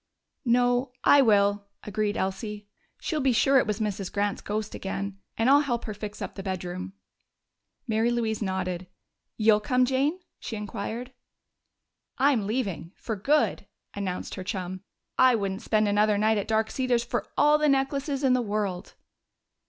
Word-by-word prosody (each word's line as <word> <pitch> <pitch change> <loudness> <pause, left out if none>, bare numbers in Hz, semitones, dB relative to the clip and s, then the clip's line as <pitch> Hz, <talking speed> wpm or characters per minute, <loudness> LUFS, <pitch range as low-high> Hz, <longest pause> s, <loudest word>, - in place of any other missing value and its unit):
"No, 245 +1 +2
I 285 - +7
will," 205 -3 +3 0.2
agreed 210 +1 -1
Elsie. 205 +2 -3 0.3
"She'll 310 - -2
be 265 -1 +3
sure 270 +3 +5
it - - 0
was 210 0 -1
Mrs. 200 -3 -2
Grant's 205 0 -1
ghost 210 0 -3
again.... 195 0 -4 0.2
And 225 - +2
I'll 280 +2 +7
help 245 -5 -1
her 215 - -4
fix 210 0 -6
up - - -6
the 195 - -7
bedroom." 185 -1 -4 0.9
Mary 225 +1 +2
Louise 230 -2 -1
nodded. 185 -2 -2 0.5
"You'll 215 -1 +5
come, 250 +4 +2
Jane?" 275 +7 +1 0.2
she 230 - -5
inquired. 220 +4 -5 1.0
"I'm 260 -7 +3
leaving 205 -7 -3
for 225 - -4
good!" 285 +10 +1 0.3
announced 190 -3 -4
her 185 - -5
chum. 185 -2 -4 0.4
"I 255 -1 +6
wouldn't 195 -1 -2
spend 215 -1 +2
another 205 0 +3
night 215 +1 +3
at 200 - -4
Dark 220 0 +1
Cedars 250 -3 +1
for 240 - -3
all 300 +1 +5
the 300 -1 +3
necklaces 275 +1 0
in 260 -2 +4
the 255 - +2
world!" 205 -4 -3
215 Hz, 160 wpm, -27 LUFS, 200-250 Hz, 1.0 s, I